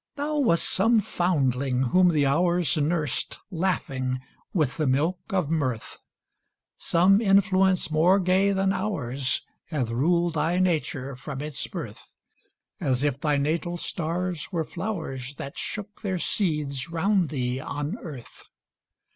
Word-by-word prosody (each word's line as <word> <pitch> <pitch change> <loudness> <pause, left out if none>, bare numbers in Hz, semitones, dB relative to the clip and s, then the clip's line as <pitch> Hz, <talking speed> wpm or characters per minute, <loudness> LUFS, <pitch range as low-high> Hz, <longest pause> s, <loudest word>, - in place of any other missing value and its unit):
Thou 295 +1 -1
wast 170 -12 +3
some 225 +4 +4
foundling 140 - 0
whom 180 +8 +4
the 150 -4 +2
Hours 170 +2 +2
Nursed, 155 -2 0
laughing, 135 -8 -1 0.3
with 155 -8 0
the 155 -3 +1
milk 155 +8 +1
of 180 -6 0
Mirth; 130 -8 -2 0.8
Some 190 +5 +4
influence 195 -3 +3
more 175 +6 +4
gay 190 +2 +3
than 195 0 +1
ours 140 - -1 0.2
Hath 130 -8 -2
ruled 170 +7 +2
thy 165 +3 +1
nature 150 -7 0
from 135 +2 -7
its 150 -1 -3
birth, 150 - -8 0.6
As 130 0 0
if 140 -2 0
thy 150 -2 +2
natal 165 +5 -1
stars 175 0 -3
were 170 -3 0
flowers 160 - -5
That 140 - -7
shook 210 0 -6
their 190 -4 -1
seeds 150 -7 -1
round 180 +1 +1
thee 125 -3 -2
on 145 +6 -4
earth. 140 - -10
165 Hz, 130 wpm, -26 LUFS, 140-185 Hz, 0.8 s, some